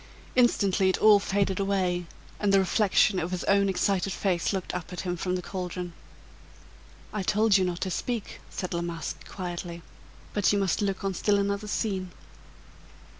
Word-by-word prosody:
Instantly 200 -6 +3
it 185 - +1
all 215 -1 +7
faded 195 -1 0
away 185 -3 0 0.3
and 205 -1 +2
the 195 - +6
reflection 195 0 +3
of 170 0 -2
his 185 -1 -3
own 200 0 +3
excited 195 0 +1
face 180 -4 0
looked 190 -3 -3
up 180 +1 -5
at 180 - -4
him 180 -1 -2
from 180 +1 -2
the 180 - -3
caldron. 180 -2 -5 1.2
"I 210 - -1
told 210 +2 +3
you 190 - +5
not 180 -1 -2
to 190 - -1
speak," 235 +4 -3
said 185 -1 -4
La 170 - -1
Masque, 170 -1 -5
quietly, 175 -2 -5 0.5
"but 205 -2 +3
you 205 - +2
must 195 0 +1
look 195 -1 -1
on 195 -1 0
still 205 +3 +2
another 200 +1 -1
scene." 195 -3 -2
190 Hz, 175 wpm, -27 LUFS, 180-200 Hz, 1.2 s, all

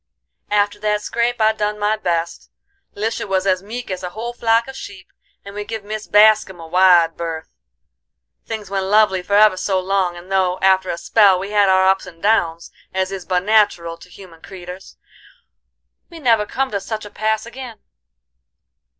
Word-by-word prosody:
"After 205 0 +1
that 210 0 -1
scrape 235 +2 -1
I 220 0 +3
done 210 0 -2
my 210 +1 +1
best; 170 -5 -3 0.5
Lisha 220 +2 -3
was 190 -1 0
as 185 -1 +1
meek 230 +3 -7
as 185 0 -4
a 180 - -5
whole 225 +6 -6
flock 230 0 +1
of 265 - -9
sheep, 195 -7 -11 0.3
and 200 - -9
we 210 0 -5
give 220 0 -6
Mis 215 +1 -6
Bascum 210 -3 +4
a 165 - -9
wide 175 -1 +4
berth. 165 -1 -6 0.9
Things 215 -3 -7
went 195 -1 -1
lovely 205 -2 +3
for 200 +3 -1
ever 210 -2 +5
so 190 0 0
long, 185 -2 -1
and 180 +2 -13
though, 185 -1 +1
after 190 -1 +3
a 170 - -2
spell, 195 +2 +4
we 195 +3 -6
had 205 -2 +3
our 190 0 +4
ups 190 0 +2
and 170 -2 -13
downs, 170 -5 0 0.2
as 190 0 -1
is 190 -2 -6
but 180 -1 0
natural 205 -6 +2
to 180 - -15
human 180 -3 -15
creeters, 185 0 -11 1.1
we 340 - -11
never 230 -8 +2
come 270 0 -2
to 200 - -1
such 215 +2 -5
a 205 - -11
pass 220 0 -1
agin. 240 -1 -9
200 Hz, 185 wpm, -19 LUFS, 185-215 Hz, 1.1 s, ever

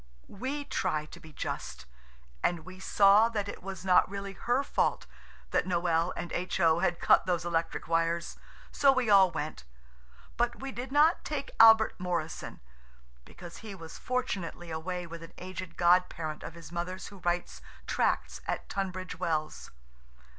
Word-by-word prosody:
We 270 +8 -4
try 155 - -1
to - - -12
be 160 - -14
just, - - -5 0.6
and 170 -2 0
we 185 0 -11
saw 200 +3 +5
that 210 -3 -2
it - - -7
was 190 -1 -7
not 180 -1 +5
really 200 0 -5
her 245 +7 0
fault - - 0 0.5
that - - +2
Noël 170 -1 +1
and 175 - -5
H.O. 170 -2 +2
had 170 - 0
cut - - +4
those 175 -2 0
electric 165 -1 -2
wires, 165 +1 0 0.4
so 280 -1 +5
we 255 -5 +1
all 195 -2 +7
went; 150 - -5 0.7
but 240 0 0
we 270 0 -5
did 255 +1 -6
not 300 +4 +4
take 290 -2 -4
Albert 225 -2 +7
Morrison, 175 -3 -4 0.6
because 175 -2 -11
he 215 -3 -8
was 165 -3 -10
fortunately 195 -9 -3
away 175 +3 -4
with 170 0 -9
an 165 - -11
aged 185 -1 -7
god 180 +1 +5
parent 155 -2 -5
of 165 - -8
his 170 -1 -11
mother's 175 +2 -4
who 200 - -13
writes 175 0 -2 0.2
tracts - - 0
at - - -3
Tunbridge 185 -2 -4
Wells. 155 -2 -2
180 Hz, 160 wpm, -30 LUFS, 170-205 Hz, 0.7 s, all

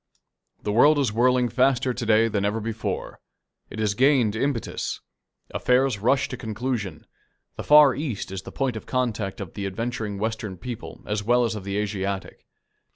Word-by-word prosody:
The 105 - -1
world 145 +8 +5
is 135 -7 +1
whirling 125 +2 +3
faster 125 +1 +2
to 120 0 -4
day 110 +1 +5
than 105 -3 -1
ever 105 +2 0
before. 110 0 -4 0.5
It - - -9
has 105 -2 +1
gained 125 -2 +3
impetus. 135 0 -2 0.5
Affairs 125 -3 +2
rush 130 +6 +2
to - - -5
conclusion. 110 -2 -4 0.5
The - - -6
Far 150 -2 +7
East 130 -9 -4
is 95 -1 -4
the - - -10
point 135 -4 -1
of 110 - -7
contact 115 -5 -2
of 100 -5 -7
the 100 -1 -3
adventuring 110 0 -3
Western 110 -2 -3
people 120 +5 -8
as 105 0 -1
well 120 +3 +3
as 115 - -1
of 105 -3 -7
the 100 0 -2
Asiatic. 100 -2 -3
115 Hz, 170 wpm, -25 LUFS, 105-125 Hz, 0.5 s, Far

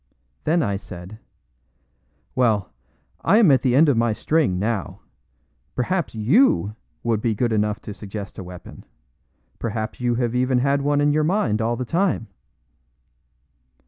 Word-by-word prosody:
Then 165 +1 +2
I 100 -2 -1
said: 95 +1 -10 1.1
"Well, 110 - +1 0.5
I 205 - +4
am 210 -9 +6
at 130 -2 +4
the 125 -1 +2
end 155 +4 +6
of 140 - +3
my 115 -1 +2
string, 150 - +1
now. 105 0 -2 0.7
Perhaps 170 +2 -1
YOU 110 - +3 0.3
would 115 -3 0
be 115 -2 0
good 120 +1 0
enough 105 -1 0
to 105 - -6
suggest 100 0 -8
a - - -5
weapon? 90 -1 -11 0.8
Perhaps 110 0 -4
you 120 -1 +1
have 120 -1 -1
even 125 +1 +2
had 140 +2 +2
one 145 +1 +1
in 145 0 +3
your 155 +1 +2
mind 150 - +1
all 115 +2 0
the 125 - -4
time?" 170 -5 0
120 Hz, 150 wpm, -22 LUFS, 105-140 Hz, 1.1 s, am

